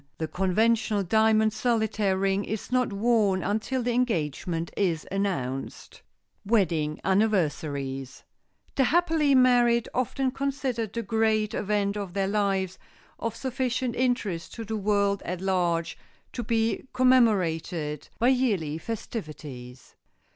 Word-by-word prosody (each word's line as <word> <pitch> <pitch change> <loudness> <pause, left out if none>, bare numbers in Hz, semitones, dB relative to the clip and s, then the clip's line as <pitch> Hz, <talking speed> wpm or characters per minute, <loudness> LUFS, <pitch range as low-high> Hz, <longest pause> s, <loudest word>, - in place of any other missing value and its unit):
The 160 - -2
conventional 210 +4 +1
diamond 220 +2 +3
solitaire 215 -4 0
ring 195 +1 +1
is 220 +3 -5
not 250 -2 +1
worn 205 -3 +2
until 220 +5 -1
the 245 - 0
engagement 170 - -1
is 170 -6 0
announced. 155 -10 -3 0.4
[Sidenote: 205 - -10
WEDDING 160 -8 +1
ANNIVERSARIES] 145 - 0 0.5
The 265 - +2
happily 320 -3 +3
married 245 -2 +4
often 260 +1 0
consider 265 -4 -2
the 230 +3 -5
Great 220 -1 +1
Event 205 -1 0
of 195 -4 -5
their 195 -1 +1
lives 195 -2 0 0.4
of 230 -1 -3
sufficient 255 -1 -2
interest 230 -9 -1
to 230 - -6
the 220 +1 -3
world 200 -1 +1
at 180 +1 -4
large 175 -3 0 0.3
to 240 - -3
be 225 +3 0
commemorated 180 - +2
by 240 - +3
yearly 200 - +1
festivities. 150 - -7
210 Hz, 120 wpm, -27 LUFS, 175-235 Hz, 0.5 s, married